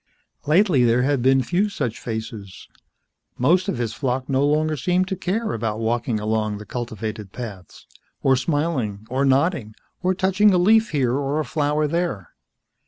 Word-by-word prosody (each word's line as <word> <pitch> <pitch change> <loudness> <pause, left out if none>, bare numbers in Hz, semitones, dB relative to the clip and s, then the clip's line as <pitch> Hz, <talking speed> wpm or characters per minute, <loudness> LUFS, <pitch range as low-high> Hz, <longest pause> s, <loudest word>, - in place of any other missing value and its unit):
Lately 160 -4 +4
there 120 +1 +3
had 140 -1 +1
been 130 +1 +4
few 185 - 0
such 135 - -3
faces. 110 -4 -7 0.7
Most 175 +9 +3
of 140 - -2
his 120 -3 -2
flock 130 -1 -2
no 135 0 +1
longer 155 +2 +1
seemed 180 +7 0
to 190 - -1
care 200 +5 -2
about 110 -1 -2
walking 115 0 -1
along 110 0 -1
the 105 - -10
cultivated 110 -4 -5
paths, 105 -8 -9 0.4
or 135 -1 +4
smiling, 130 -7 -1
or 135 +2 +1
nodding, 135 - +1 0.3
or 185 +1 +1
touching 190 +2 +3
a - - +4
leaf 220 +5 +4
here 130 -5 +1
or 140 +2 -1
a 155 - -1
flower 150 +2 0
there. 160 - -2
135 Hz, 165 wpm, -22 LUFS, 115-170 Hz, 0.7 s, Lately